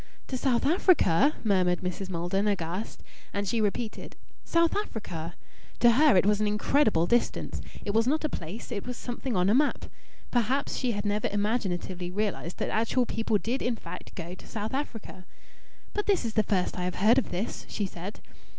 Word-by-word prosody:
"To 260 Hz, -, -2 dB
South 255 Hz, -1 st, +1 dB
Africa?" 300 Hz, -, +4 dB
murmured 185 Hz, -4 st, +2 dB
Mrs. 185 Hz, +1 st, -4 dB
Maldon, 185 Hz, +3 st, 0 dB
aghast. 190 Hz, +1 st, -2 dB, 0.3 s
And 200 Hz, 0 st, -1 dB
she 225 Hz, +3 st, +1 dB
repeated, 215 Hz, +2 st, -2 dB, 0.3 s
"South 335 Hz, -1 st, +2 dB
Africa?" 175 Hz, -, -4 dB, 0.4 s
To 240 Hz, 0 st, +7 dB
her 280 Hz, -1 st, +5 dB
it 180 Hz, -, +4 dB
was 210 Hz, 0 st, +3 dB
an 210 Hz, -, +2 dB
incredible 210 Hz, -, +3 dB
distance. 240 Hz, +6 st, 0 dB, 0.2 s
It 200 Hz, -, -1 dB
was 225 Hz, +2 st, +3 dB
not 310 Hz, +4 st, +1 dB
a -, -, +2 dB
place 200 Hz, -, -6 dB
it 205 Hz, -1 st, -4 dB
was 250 Hz, -1 st, -4 dB
something 245 Hz, 0 st, -4 dB
on 180 Hz, -1 st, +3 dB
the 200 Hz, -, +4 dB
map. 290 Hz, +4 st, +2 dB, 0.5 s
Perhaps 250 Hz, +3 st, +1 dB
she 250 Hz, -3 st, 0 dB
had 205 Hz, 0 st, -3 dB
never 205 Hz, +1 st, +1 dB
imaginatively 190 Hz, -4 st, -1 dB
realized 190 Hz, -3 st, -2 dB
that -, -, -2 dB
actual 230 Hz, +3 st, +2 dB
people 225 Hz, -2 st, 0 dB
did 235 Hz, +8 st, -2 dB
in 245 Hz, -1 st, 0 dB
fact -, -, -9 dB
go 170 Hz, 0 st, -6 dB
to -, -, -12 dB
South 215 Hz, +1 st, -4 dB
Africa. 225 Hz, -9 st, -5 dB, 0.7 s
"But 415 Hz, -, -2 dB
this 390 Hz, -11 st, +2 dB
is 225 Hz, -, -2 dB
the 215 Hz, -, +4 dB
first 190 Hz, -3 st, 0 dB
I 180 Hz, -, -1 dB
have 180 Hz, -, -2 dB
heard 225 Hz, +7 st, +5 dB
of -, -, -4 dB
this!" 185 Hz, +6 st, -4 dB
she 205 Hz, -, -2 dB
said. 185 Hz, +2 st, -7 dB
215 Hz, 185 wpm, -28 LUFS, 185-245 Hz, 0.7 s, To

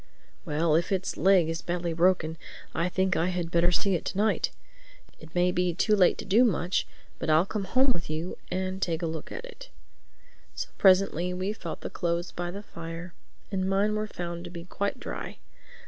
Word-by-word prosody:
"Well, 155 Hz, 0 st, +1 dB
if 170 Hz, +4 st, +2 dB
its 190 Hz, -1 st, -1 dB
leg 190 Hz, -3 st, +5 dB
is 165 Hz, 0 st, -2 dB
badly 175 Hz, -1 st, -2 dB
broken 165 Hz, -1 st, +2 dB, 0.3 s
I 170 Hz, +2 st, 0 dB
think 190 Hz, +1 st, +1 dB
I 170 Hz, -, +2 dB
had 175 Hz, -2 st, -2 dB
better 170 Hz, +1 st, +4 dB
see 195 Hz, +3 st, +2 dB
it 175 Hz, -, 0 dB
to -, -, -3 dB
night. 215 Hz, +2 st, +2 dB, 0.7 s
It 160 Hz, +2 st, -14 dB
may 180 Hz, 0 st, +3 dB
be 180 Hz, -1 st, 0 dB
too 210 Hz, +3 st, +3 dB
late 185 Hz, -3 st, +4 dB
to -, -, -6 dB
do 220 Hz, +6 st, +5 dB
much; 185 Hz, -5 st, +1 dB, 0.3 s
but -, -, -2 dB
I'll 155 Hz, +3 st, +5 dB
come 200 Hz, 0 st, -3 dB
home 255 Hz, +7 st, +3 dB
with 165 Hz, -, -5 dB
you 160 Hz, +3 st, -3 dB
and 185 Hz, +1 st, -2 dB
take 165 Hz, -1 st, -1 dB
a -, -, +2 dB
look 160 Hz, -1 st, -5 dB
at 470 Hz, +1 st, -6 dB
it." -, -, -11 dB, 0.9 s
So -, -, -4 dB
presently 185 Hz, -2 st, +4 dB
we 190 Hz, +3 st, -1 dB
felt -, -, -7 dB
the -, -, -5 dB
clothes 170 Hz, -1 st, -1 dB
by 175 Hz, 0 st, -4 dB
the 200 Hz, +3 st, -6 dB
fire 165 Hz, 0 st, -8 dB, 0.4 s
and 190 Hz, -1 st, 0 dB
mine 200 Hz, +2 st, +2 dB
were 215 Hz, 0 st, -1 dB
found 170 Hz, -3 st, -5 dB
to -, -, -7 dB
be 170 Hz, -1 st, -8 dB
quite 200 Hz, +2 st, -2 dB
dry. -, -, -6 dB
180 Hz, 200 wpm, -28 LUFS, 170-195 Hz, 0.9 s, leg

